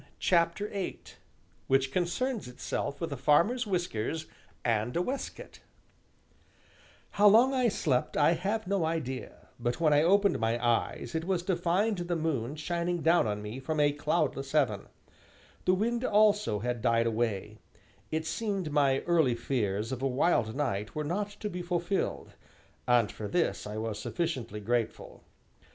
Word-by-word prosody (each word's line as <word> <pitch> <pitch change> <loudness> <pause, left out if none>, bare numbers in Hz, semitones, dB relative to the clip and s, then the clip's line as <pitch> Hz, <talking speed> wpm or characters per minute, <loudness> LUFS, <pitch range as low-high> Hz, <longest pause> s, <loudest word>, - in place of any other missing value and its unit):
CHAPTER 170 +3 +2
VIII 195 -2 -4 0.7
WHICH 135 0 +2
CONCERNS 200 - -1
ITSELF 135 +3 -4
WITH 165 -3 -3
A - - -5
FARMER'S 215 - +3
WHISKERS 160 - -2 0.4
AND 115 +3 0
A - - +2
WAISTCOAT 265 +7 -5 1.5
How 205 +1 +5
long 235 +6 +6
I 255 -2 +2
slept 140 - 0
I 150 +2 +5
have 200 +6 -1
no 195 -1 0
idea, 150 -6 -4
but 120 +4 -2
when 155 -3 +4
I 145 - +5
opened 200 +3 +3
my 115 +1 +1
eyes 120 0 -1
it 160 0 -2
was 185 -2 0
to 185 0 0
find 180 +4 +1
the 175 0 -2
moon 150 -5 -2
shining 170 +2 -2
down 165 -7 +4
on 105 0 -3
me 105 +5 -6
from 155 +3 -3
a 145 0 +4
cloudless 145 -2 -1
heaven; 125 -10 +1 0.8
the 185 - +4
wind 235 +5 0
also 210 - +3
had 120 0 -2
died 115 -1 +2
away; 110 -2 -2 0.5
it 160 0 -2
seemed 195 -4 -2
my 140 -2 +3
early 160 -8 +2
fears 115 -3 -1
of 130 -1 -4
a 135 - +1
wild 125 -4 +1
night 105 -8 -2
were 155 - -1
not 200 +7 -2
to 210 - -2
be 180 -3 -4
fulfilled, 175 +2 -2 0.5
and 120 -4 +3
for 105 - -6
this 170 -4 0
I 105 +1 -5
was 110 -1 -3
sufficiently 125 -7 -3
grateful. 115 +2 -2
155 Hz, 155 wpm, -30 LUFS, 120-180 Hz, 1.5 s, long